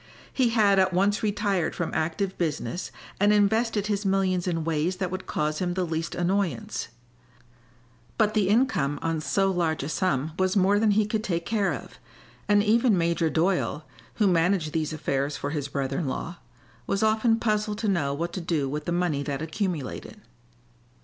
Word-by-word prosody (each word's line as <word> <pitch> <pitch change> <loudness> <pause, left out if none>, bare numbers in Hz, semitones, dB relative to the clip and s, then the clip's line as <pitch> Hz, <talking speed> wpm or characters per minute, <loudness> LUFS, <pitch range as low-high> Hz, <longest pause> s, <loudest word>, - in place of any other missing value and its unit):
He 255 -3 +2
had 210 -4 +4
at 185 -1 +3
once 200 +3 +2
retired 205 -5 0
from 170 - -3
active 185 +5 -1
business 170 +2 -2 0.3
and 205 +1 +4
invested 210 +1 +2
his 205 -1 -1
millions 190 -2 +1
in 165 -2 -1
ways 165 +3 0
that 185 -1 -3
would 185 0 -5
cause 150 0 -1
him 175 -1 -1
the 185 -1 0
least 165 0 -3
annoyance; 175 - -1 1.3
but 215 0 +2
the 205 -3 +2
income 200 - +2
on 165 -1 -1
so 195 +7 +1
large 165 -5 0
a 140 - -4
sum 155 -4 0
was 185 +1 +1
more 200 +2 +4
than 220 0 +3
he 215 - +4
could 215 +1 -2
take 170 -4 -2
care 205 0 +1
of, - - -7 0.5
and 205 0 +5
even 225 0 +3
Major 170 -1 +1
Doyle, 170 -2 0 0.3
who 215 - +2
managed 175 -3 +2
these 155 -1 -1
affairs 145 -2 -2
for 140 - -4
his 145 -2 -2
brother 135 -1 -2
in 160 - -2
law, 170 +6 -4 0.5
was 195 +2 0
often 220 +1 +3
puzzled 210 -2 0
to 220 0 -2
know 170 -9 +1
what 170 +5 -3
to 185 - -4
do 160 -5 -1
with 150 +2 -4
the - - -2
money 175 -5 0
that 140 +1 -3
accumulated. 165 +1 -4
180 Hz, 180 wpm, -26 LUFS, 160-205 Hz, 1.3 s, and